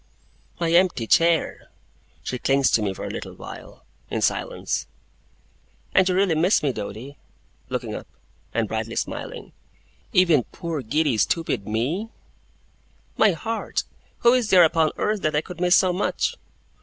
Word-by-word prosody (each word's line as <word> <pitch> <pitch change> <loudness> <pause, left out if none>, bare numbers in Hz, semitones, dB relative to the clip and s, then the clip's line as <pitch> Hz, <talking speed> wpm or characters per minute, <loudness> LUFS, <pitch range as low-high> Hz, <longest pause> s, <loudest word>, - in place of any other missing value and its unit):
'My 170 -1 0
empty 175 -8 +3
chair!' 165 +6 +2 0.5
She 125 - -4
clings 135 +1 +2
to 110 - +3
me 100 -2 0
for 95 - -6
a - - -4
little - - -7
while, - - -11 0.2
in - - -2
silence. - - -1 1.1
'And 190 0 +4
you 180 - +1
really 190 -2 +3
miss 170 +5 +3
me, 140 -3 +1
Doady?' 110 +6 -7 0.5
looking - - -3
up, - - -7 0.4
and - - 0
brightly - - -3
smiling. - - -5 0.6
'Even 170 - +4
poor, 165 -5 -5
giddy, 140 0 0
stupid 160 - 0
me?' 135 - -1 1.1
'My 215 -4 +4
heart, 225 +7 -3 0.4
who 240 0 +6
is 245 -4 +1
there 180 -3 +7
upon 160 -1 +3
earth 210 -1 0
that 155 -1 0
I 150 - +3
could 175 +1 -10
miss 180 +1 +5
so 185 -1 +4
much? 185 - 0
165 Hz, 150 wpm, -24 LUFS, 135-185 Hz, 1.1 s, there